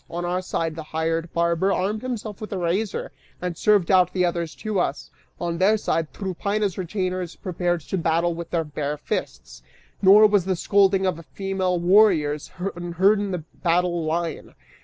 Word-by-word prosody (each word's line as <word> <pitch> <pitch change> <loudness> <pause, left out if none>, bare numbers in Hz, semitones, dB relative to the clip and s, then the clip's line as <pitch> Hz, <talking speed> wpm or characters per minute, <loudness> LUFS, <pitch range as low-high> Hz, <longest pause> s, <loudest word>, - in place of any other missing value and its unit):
On 175 +1 -4
our 180 +1 -1
side, 165 -3 -2
the 160 - -5 0.2
hired 165 +1 -1
barber 170 +3 +1
armed 205 +3 -1
himself 225 -5 -5
with 215 - -7
a 195 - -2
razor 185 +4 -2 0.3
and 180 -1 -3
served 205 -1 +3
out 180 -2 +4
the 180 -1 +2
others 170 -2 -2
to 215 -3 -2
us; - - -2 0.3
on 170 -1 -3
their 205 +4 +4
side, 165 -6 -1
Tryphaena's 200 +1 -2
retainers 185 -1 -3
prepared 175 -1 -2
to 190 +5 -3
battle 170 +1 +1
with 170 0 -7
their 170 -2 0
bare 150 -1 -4
fists, 60 - -5 0.4
nor 200 +3 +8
was 205 -4 +3
the 190 -1 0
scolding 195 +1 +3
of 170 -3 -1
female 190 -2 -1
warriors 175 -6 +3 0.3
unheard 175 +4 +2
in 205 -1 -2
the 180 -4 -3 0.2
battle 175 -1 +1
line. 165 +1 -3
180 Hz, 170 wpm, -23 LUFS, 170-195 Hz, 0.4 s, nor